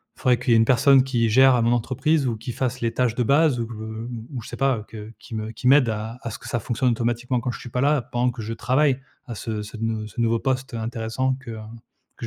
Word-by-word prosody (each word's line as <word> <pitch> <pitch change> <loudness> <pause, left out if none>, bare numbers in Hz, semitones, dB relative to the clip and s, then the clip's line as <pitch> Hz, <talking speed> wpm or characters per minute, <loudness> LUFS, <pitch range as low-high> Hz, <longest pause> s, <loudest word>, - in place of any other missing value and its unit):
faudrait 125 -1 +2
qu'il - - -2
y - - +7
ait 115 - +5
une 115 - +4
personne 130 +2 +5
qui 120 -4 +1
gère 130 +1 +6
mon 120 +1 +3
entreprise 135 +5 +1
ou 115 -3 -1
qui 115 +3 -6
fasse 125 +1 -2
les 115 -1 0
tâches 125 -3 +1
de 125 - 0
base 140 +1 +3
ou 115 - -2
que 115 - -9
ou 110 +2 -6 0.2
ou 120 - -4
je - - -11
sais - - -8
pas, 135 -2 +2
heu, 105 - -8
que 110 0 -9
qui 115 - -11
me 110 0 -4
qui 115 - -6
m'aide 135 -1 +6
à 110 +2 -4
à 115 - -4
ce - - -7
que - - -10
ça 120 - -1
fonctionne 125 +3 0
automatiquement 120 +1 -1
quand 125 - -2
je - - -6
suis 120 - -10
pas 125 - -1
là 145 -1 +3
pendant 120 +1 0
que 115 -1 -7
je 110 +2 -4
travaille 130 +3 +1 0.3
à 120 - -6
ce 110 0 -4
ce 105 - -9
nou 110 -1 -2
ce 120 +3 -7
nouveau 115 0 +2
poste, 130 0 -2
heu, - - -3
intéressant 115 +3 -2
que, 120 -3 -8
heu, 110 - -7 0.6
que - - -6
120 Hz, 285 wpm, -23 LUFS, 115-130 Hz, 0.6 s, y